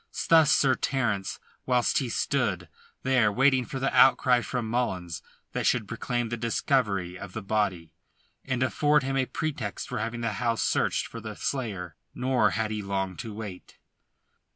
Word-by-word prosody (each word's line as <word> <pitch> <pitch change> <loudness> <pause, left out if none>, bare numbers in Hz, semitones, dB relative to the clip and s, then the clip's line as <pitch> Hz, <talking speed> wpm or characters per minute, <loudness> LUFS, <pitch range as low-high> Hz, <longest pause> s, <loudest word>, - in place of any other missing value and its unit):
Thus 160 -3 +7
Sir 135 -4 +4
Terence 115 -8 -1 0.3
whilst 125 -2 +2
he 130 - -3
stood - - -1 0.3
there 125 -5 +3
waiting 130 +2 +3
for 135 +1 -5
the 135 - -1
outcry 125 -2 +5
from 120 -2 -3
Mullins 95 -8 -2 0.3
that - - -1
should - - +1
proclaim 120 -2 -2
the 120 - -3
discovery 105 - 0
of 95 -1 -8
the 110 - -5
body, 95 -6 -1 0.5
and 130 -1 -1
afford 145 +2 +2
him 135 +1 -2
a 130 -1 +1
pretext 150 -10 -4
for - - -3
having 115 +2 -3
the 115 -2 -1
house 115 -2 +1
searched - - +1
for 115 - -8
the 110 0 -7
slayer. 100 - -4 0.2
Nor 125 -4 +2
had 110 +2 -1
he 105 -1 -2
long 95 -1 -2
to 115 - -6
wait. 105 -4 -8
115 Hz, 165 wpm, -27 LUFS, 100-130 Hz, 0.5 s, Thus